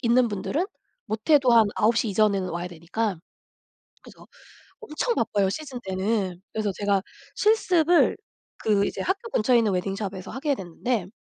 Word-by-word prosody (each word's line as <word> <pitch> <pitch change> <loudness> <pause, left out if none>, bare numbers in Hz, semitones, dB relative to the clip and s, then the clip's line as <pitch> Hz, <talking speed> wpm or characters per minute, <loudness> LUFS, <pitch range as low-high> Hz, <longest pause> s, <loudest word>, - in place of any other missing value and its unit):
있는 240 0 +3
분들은 215 - -2 0.4
못해도 255 +3 +3
한 225 -2 +6
9:00 230 +2 +2
이전에는 200 -2 +2
와야 175 +1 -4
되니까. 180 +5 -3 0.9
그래서 - - -15 0.5
엄청 460 +10 -2
바빠요 205 -4 +1
시즌 270 +1 -6
때는. 190 -1 -1
그래서 215 -2 -1
제가 200 -2 +1 0.3
실습을 355 -6 +3 0.4
그 205 -2 +1
이제 - - -4
학교 395 +5 -2
근처에 240 - +3
있는 220 -3 +2
웨딩샵에서 195 0 -3
하게 280 +3 -1
됐는데 195 +2 -3
215 Hz, 310 characters per minute, -25 LUFS, 195-255 Hz, 0.9 s, 한